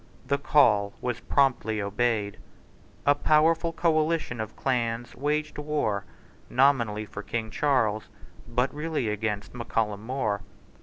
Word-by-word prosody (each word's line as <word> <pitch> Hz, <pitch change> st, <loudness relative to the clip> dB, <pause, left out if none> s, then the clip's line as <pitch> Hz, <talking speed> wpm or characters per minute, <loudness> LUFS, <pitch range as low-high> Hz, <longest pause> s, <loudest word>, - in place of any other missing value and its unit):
The 140 Hz, 0 st, 0 dB
call 105 Hz, -9 st, +4 dB
was 125 Hz, -1 st, -2 dB
promptly 125 Hz, -6 st, +1 dB
obeyed. 105 Hz, 0 st, -1 dB, 0.7 s
A 145 Hz, -, +6 dB
powerful 160 Hz, +3 st, +3 dB
coalition 160 Hz, -6 st, +1 dB
of 110 Hz, 0 st, -6 dB
clans 120 Hz, -2 st, -1 dB
waged 150 Hz, +2 st, -1 dB
war, 145 Hz, -10 st, -1 dB, 0.4 s
nominally 120 Hz, -6 st, +2 dB
for 100 Hz, -, -7 dB
King 110 Hz, 0 st, -4 dB
Charles, 110 Hz, -6 st, +1 dB, 0.4 s
but 125 Hz, +2 st, 0 dB
really 150 Hz, -5 st, -2 dB
against 105 Hz, -1 st, -3 dB
Mac 120 Hz, -1 st, -7 dB
Callum 105 Hz, -2 st, 0 dB
More. 110 Hz, -5 st, -1 dB
120 Hz, 120 wpm, -27 LUFS, 110-145 Hz, 0.7 s, A